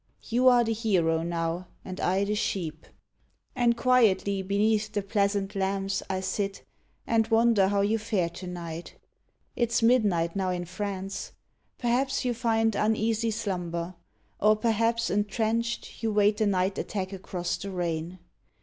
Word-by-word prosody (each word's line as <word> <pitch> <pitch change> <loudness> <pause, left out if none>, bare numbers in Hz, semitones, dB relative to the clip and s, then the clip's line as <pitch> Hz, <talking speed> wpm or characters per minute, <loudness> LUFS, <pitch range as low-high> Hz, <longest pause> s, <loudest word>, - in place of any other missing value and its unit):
You 250 +2 +3
are 245 -1 +6
the 225 0 0
hero 180 -8 +1
now, 170 +1 -2 0.2
and 185 0 -6
I 190 +2 +1
the 205 +1 -1
sheep! 170 -7 -3 0.7
And 240 -2 +2
quietly 210 -6 +3
beneath 210 +2 +1
the 205 - -2
pleasant 200 0 0
lamps 195 0 -1
HENRI 190 - 0
I - - -3
sit, 195 +1 -3 0.4
and 225 -1 +2
wonder 225 -3 +4
how 200 0 +1
you 215 +3 +1
fare 210 -6 0
to 180 +2 -8
night. 170 -1 -7 0.6
It 235 -2 +1
s 235 0 +1
midnight 205 -9 +3
now 190 -1 0
in 180 -1 -2
France. 195 +1 -5 0.4
Perhaps 260 +3 0
you 245 - +1
find 225 -1 +1
Uneasy 220 +1 +1
slumber; 180 -5 -3 0.5
or 215 +1 +5
perhaps, 230 +1 +1
entrenched, 220 +3 -1
You 225 -1 0
wait 210 0 +3
the 215 - +2
night 190 0 +1
attack 190 -1 -3
across 180 -2 -3
the 200 - -6
rain. 175 -1 -3
200 Hz, 150 wpm, -27 LUFS, 185-225 Hz, 0.7 s, are